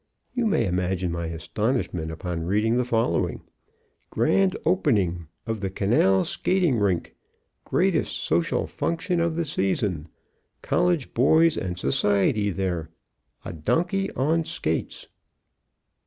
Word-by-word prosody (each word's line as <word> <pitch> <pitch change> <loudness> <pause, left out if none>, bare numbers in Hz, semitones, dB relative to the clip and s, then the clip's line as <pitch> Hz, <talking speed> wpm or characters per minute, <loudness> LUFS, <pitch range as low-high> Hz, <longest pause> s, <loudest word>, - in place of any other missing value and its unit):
You 245 -3 0
may 210 - +2
imagine 90 -1 -1
my 85 0 -3
astonishment 90 0 -2
upon 85 +1 -4
reading 105 +5 +2
the 125 - +2
following: 115 -2 0 0.7
GRAND 195 -1 +2
OPENING 95 - +1 0.2
Of 110 -1 -3
the 95 -1 -2
Canal 95 -1 +2
Skating 175 -10 +1
Rink. 95 -5 0 0.5
Greatest - - +1
Social 85 +1 0
Function 175 +1 -2
of 170 -1 0
the 170 0 -1
Season. 95 - -1 0.6
COLLEGE 175 -6 +1
BOYS 160 +6 +4
AND 90 -1 -3
SOCIETY 105 -1 +1
THERE. 90 -4 -2 0.6
A - - -5
Donkey 175 - 0
on 160 +5 +1
Skates. 80 - -3
105 Hz, 115 wpm, -25 LUFS, -, 0.7 s, BOYS